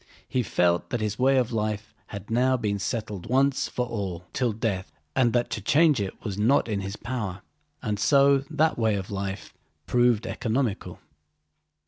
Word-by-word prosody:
He 130 - 0
felt 90 -5 +1
that 120 - -1
his 105 -1 -2
way 135 +1 +4
of 125 -1 +1
life 105 -1 -2
had 100 +1 -8
now 130 +2 +3
been 105 -4 -1
settled 105 -1 -4
once 135 +2 +2
for 125 - -2
all 95 -7 -4
till 125 -3 +1
death 105 - -2 0.2
and 120 -3 +3
that 120 -1 +1
to 110 - -3
change 150 - +4
it 100 +3 -6
was 100 -2 -3
not 120 +6 +3
in 105 -3 -1
his 100 +1 -5
power, 105 -7 -4 0.4
and 105 -4 -2
so 140 +3 +5
that 155 -3 +1
way 110 -2 +2
of 100 +1 -5
life 100 -1 -4 0.3
proved 120 -3 +2
economical. 115 -2 -2
110 Hz, 170 wpm, -26 LUFS, 100-125 Hz, 0.4 s, so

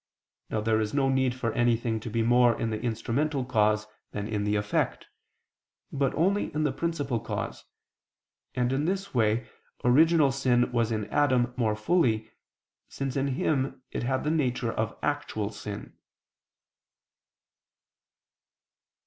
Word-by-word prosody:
Now 110 - -1
there 110 0 +2
is 105 +4 -2
no 135 -2 +3
need 130 -2 +1
for 115 -3 -2
anything 115 -1 +1
to 115 - -6
be 115 +1 0
more 120 0 +4
in 115 - -1
the 110 0 -3
instrumental 125 +5 -1
cause 110 -3 +2 0.3
than 105 0 -3
in 105 -2 -2
the 105 0 +1
effect; 105 0 -1 0.9
but 135 -2 +1
only 195 +6 +1
in 155 - +1
the 150 - +2
principal 145 -5 -2
cause: - - -5 0.9
and, 125 +1 +1
in 140 +3 0
this 195 +2 -2
way, 115 -1 +1 0.4
original 150 +3 +5
sin 125 -2 +2
was 115 -2 +1
in 110 -2 -1
Adam 130 -4 +2
more 110 -4 +1
fully, 110 -3 +1 0.6
since 135 -2 -4
in 140 0 +1
him 135 -3 -1
it - - -3
had 130 +2 -1
the 150 - 0
nature 125 -6 0
of 110 0 -2
actual 110 -8 -2
sin. 105 -1 -7
125 Hz, 140 wpm, -28 LUFS, 110-140 Hz, 0.9 s, original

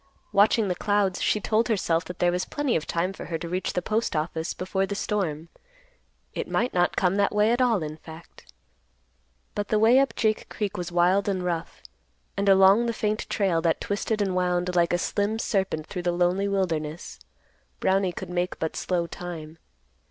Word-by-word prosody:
Watching 205 +1 +4
the 180 - +1
clouds, 200 0 0
she 210 - +2
told 220 +3 +1
herself 180 -6 0
that 180 - -8
there 175 0 +2
was 180 +1 -1
plenty 290 -4 -1
of 160 - -2
time 175 +3 -1
for - - -8
her 165 - -3
to 170 - -6
reach 180 +2 -2
the 180 - -1
Postoffice 165 -7 -1
before 190 +1 -1
the 200 - -3
storm. 170 -7 -2 0.8
It - - -4
might 245 - 0
not 175 0 +2
come 185 +1 +2
that 200 0 +1
way 210 +2 +4
at 240 +2 +1
all, 230 -8 +2
in 155 0 -6
fact. 160 - -14 1.0
But 205 0 -3
the 215 - +1
way 225 +4 +6
up 275 - +1
Jake 215 -1 0
Creek 205 -2 -3
was 180 -2 -4
wild 180 +4 +3
and 185 -2 -1
rough, 170 -1 -4 0.5
and 200 0 +1
along 195 +4 +6
the 235 - 0
faint 215 -1 -2
trail, 185 -5 +1
that 165 -1 +1
twisted 205 +1 -1
and 190 -2 -1
wound 180 0 0
like 170 -1 +3
a 175 - +2
slim 205 +4 -1
serpent 190 -8 -1
through 180 - -5
the 175 0 0
lonely 180 +3 +1
wilderness, 170 -5 -2 0.6
Brownie 190 -1 +2
could 175 - -7
make 180 +1 -1
but 160 - -3
slow 175 -2 -1
time. 165 -2 -8
185 Hz, 190 wpm, -26 LUFS, 175-205 Hz, 1.0 s, way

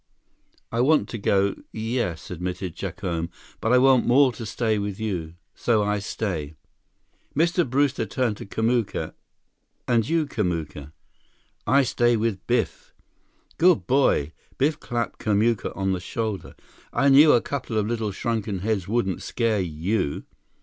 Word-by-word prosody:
"I 115 - +1
want 150 +4 +3
to 115 - -5
go, 100 0 +2 0.2
yes," 110 -7 -3
admitted 90 0 -4
Jacome, 90 -3 -3 0.3
"but 115 - 0
I 125 - +6
want 130 -1 +5
more 130 +2 +5
to 115 -1 -7
stay 110 -1 0
with 100 0 -4
you. 90 -7 -3 0.2
So 110 -3 +1
I 105 0 0
stay." 85 -7 -4 0.8
Mr. 170 0 +2
Brewster 135 -3 +1
turned 115 0 -1
to - - -9
Kamuka. 115 +1 -1 0.7
"And 120 0 +2
you, 165 -1 +2
Kamuka?" 80 - -3 0.8
"I 135 +5 +5
stay 120 -1 +2
with 110 -3 -2
Biff." 120 +1 -1 0.6
"Good 175 -1 +4
boy!" 130 - +2 0.3
Biff 150 +3 +1
clapped 120 -1 -3
Kamuka 110 +1 +1
on 95 0 0
the 95 - -1
shoulder. 105 0 -4 0.4
"I 140 - +3
knew 145 +3 +8
a 120 - +5
couple 130 -5 -4
of 105 - +1
little 110 -2 -2
shrunken 105 -2 -2
heads 100 -3 -1
wouldn't 100 -4 0
scare 115 -3 0
you." 90 +1 -2
110 Hz, 145 wpm, -24 LUFS, 95-125 Hz, 0.8 s, knew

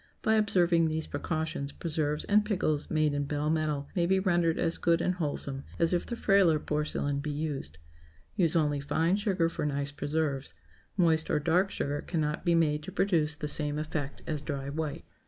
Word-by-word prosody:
By 220 - +3
observing 180 -6 +3
these 155 0 -2
precautions, 155 -1 -3
preserves 150 -2 -2
and 210 +1 +3
pickles 165 -8 0
made 155 -2 +2
in 145 0 -1
bell 150 +1 -1
metal 150 -3 -1
may 170 -2 +2
be 190 +1 +3
rendered 175 -3 +2
as 165 - 0
good 170 -1 +3
and 180 +2 +1
wholesome 145 -5 -3
as 165 +1 +2
if 175 - 0
the 235 - -3
frailer 195 -8 +4
porcelain 150 -1 -1
be 150 +2 -4
used. 145 - -4 0.6
Use 175 -6 +2
only 150 -3 +2
fine 160 +5 +1
sugar 195 -5 +1
for 165 - -4
nice 145 -1 -1
preserves. 145 -1 -2 0.4
Moist 160 -3 +3
or - - +2
dark 175 +6 +2
sugar 145 -5 -2
cannot 150 -3 -2
be 170 -2 +3
made 150 -2 +2
to - - -8
produce 160 -6 +1
the 150 - -3
same 150 0 -1
effect 150 -2 -4
as 155 -2 -2
dry 140 -2 -4
white. 150 0 -4
155 Hz, 185 wpm, -29 LUFS, 145-170 Hz, 0.6 s, frailer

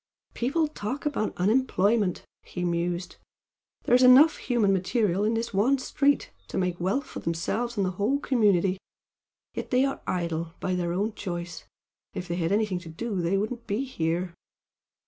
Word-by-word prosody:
"People 295 +7 0
talk 270 -1 -5
about 280 -7 -1
unemployment!" 205 -1 +2 0.2
he 180 - -6
mused 175 +1 -2 0.7
"There's 245 +1 +4
enough 260 +5 +7
human 225 -6 +1
material 190 +1 +1
in 220 +2 +1
this 230 -1 -3
one 235 +8 +3
street 280 +2 +1 0.2
to - - -5
make 180 -2 -1
wealth 220 +11 0
for - - -8
themselves 225 +8 -2
and 200 - +2
the 185 - -1
whole 250 +8 +2
community, 200 -9 +2 0.7
yet - - -5
they 255 +1 +3
are 270 - -3
idle 170 -2 -2
by 185 - -1
their 175 -1 -1
own 205 +5 -1
choice. 175 -4 -6 0.5
If 180 - -4
they 170 0 -2
had 165 0 0
anything 205 -3 +1
to 170 -2 -11
do 195 +3 -3
they 175 +3 +1
wouldn't 230 +4 -3
be 210 +6 -1
here!" 175 -7 -2
200 Hz, 165 wpm, -27 LUFS, 175-245 Hz, 0.7 s, enough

